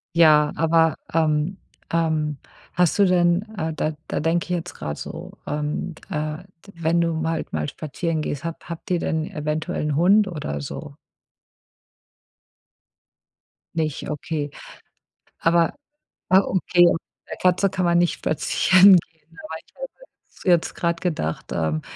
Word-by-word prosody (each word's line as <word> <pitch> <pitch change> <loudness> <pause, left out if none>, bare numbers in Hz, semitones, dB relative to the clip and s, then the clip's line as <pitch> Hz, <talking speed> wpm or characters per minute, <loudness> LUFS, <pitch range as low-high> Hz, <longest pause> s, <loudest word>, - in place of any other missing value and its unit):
Ja, 150 -3 +6
aber, 165 0 +3 0.2
ähm, 160 +2 +1 0.4
ähm, 155 -3 0 0.4
hast 180 +2 +2
du 200 - +7
denn, 175 +1 +3
äh 160 -2 -2
da 155 0 -1 0.2
da - - -1
denke 165 +2 +1
ich - - -16
jetzt 175 -1 -3
grad 75 0 -5
so, - - -8
ähm, 150 +3 -3
äh 150 0 -3 0.3
wenn 170 0 +1
du 170 -1 +1
mal - - -3
im 160 - -2
Wald - - -7
mal 75 -1 -1
spazieren 160 +1 -3
gehst, 145 0 -4
habt 165 0 -6
habt 170 +2 -7
ihr 175 - +2
denn 160 -1 -1
eventuell 150 +1 -2
'n 150 -1 0
Hund 195 +6 +5
oder 150 - -4
so? 70 - -7 2.8
Nicht, 155 -3 -2
okay. 150 -1 -3 0.9
Aber 165 0 +3 0.6
ah, 190 - +7
okay, 180 -2 +2
'ne 170 -1 -2
Katze 185 +2 +3
kann 185 -1 -1
man 170 0 +3
nicht 175 0 +3
spazieren 185 +4 +5
gehen, 160 +2 -27
aber - - -6
ich - - -30
habe - - -5 0.7
jetzt 170 -2 +2
grade 170 -1 -1
gedacht, 155 - -3
ähm, 80 -2 -1
165 Hz, 145 wpm, -23 LUFS, 150-175 Hz, 2.8 s, du